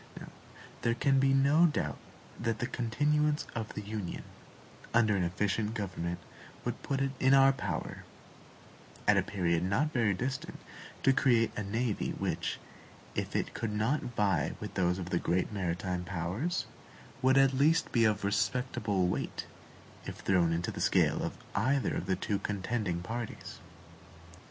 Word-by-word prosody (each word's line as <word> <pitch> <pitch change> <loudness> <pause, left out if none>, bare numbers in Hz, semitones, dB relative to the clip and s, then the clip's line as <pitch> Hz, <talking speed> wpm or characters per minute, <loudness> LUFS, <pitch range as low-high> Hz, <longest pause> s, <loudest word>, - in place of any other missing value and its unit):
There 115 0 +1
can 135 +2 +3
be 135 0 +4
no 140 +5 +5
doubt 150 - -2 0.4
that 115 -1 -1
the 120 - -2
continuance 150 +6 +1
of 110 -2 -5
the 105 - -4
Union 105 -3 -5 0.7
under 110 -3 +4
an 95 - +1
efficient 105 +5 0
government 90 -4 -3 0.5
would - - -3
put 135 -1 -1
it 135 0 +1
in 130 +1 +5
our 135 0 +6
power, 100 -11 -4 1.0
at - - +6
a - - +4
period 85 -4 0
not 110 +12 +1
very 110 -6 +2
distant, 135 - -4 0.5
to 135 - +5
create 120 -4 +3
a - - -2
navy 110 +2 -1
which, - - -2 0.5
if - - -3
it - - -1
could 115 -2 -3
not 110 +8 +1
vie 100 - 0
with - - -6
those 90 0 +1
of 90 -1 -5
the 85 - +2
great 90 +4 0
maritime 90 -1 -2
powers, 90 - -2 0.6
would 130 +1 +4
at 135 -1 +5
least 155 +5 +3
be 115 - +3
of 105 -2 +2
respectable 105 -2 0
weight 90 - -3 0.6
if - - -5
thrown 90 -3 +3
into 85 +1 -1
the - - -6
scale - - +3
of - - -3 0.2
either 130 +6 +1
of 95 -1 -1
two 105 -3 0
contending 100 -3 -2
parties. 115 +4 -6
110 Hz, 150 wpm, -31 LUFS, 95-130 Hz, 1.0 s, our